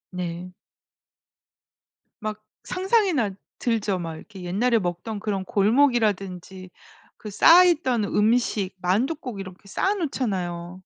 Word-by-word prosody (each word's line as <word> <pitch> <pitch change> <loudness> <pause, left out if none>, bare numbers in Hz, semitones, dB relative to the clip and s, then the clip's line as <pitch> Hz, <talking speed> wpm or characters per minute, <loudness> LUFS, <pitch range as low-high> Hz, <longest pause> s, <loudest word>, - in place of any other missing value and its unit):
네. 180 0 -5 1.7
막 215 0 -4 0.2
상상이나 370 - +1 0.3
들죠. 210 -5 0
막 165 -2 -5
이렇게 190 -2 -12
옛날에 225 +6 +1
먹던 180 +4 -4
그런 200 -2 -3
골목이라든지 200 -6 +1 0.5
그 215 - -8
쌓아 345 - +7
있던 260 -10 +2
음식, 210 -2 +1
만두 215 - +1
꼭 250 -9 -7
이렇게 190 0 -10
쌓아 385 - 0
놓잖아요. 185 - -3
210 Hz, 245 characters per minute, -24 LUFS, 185-245 Hz, 1.7 s, 쌓아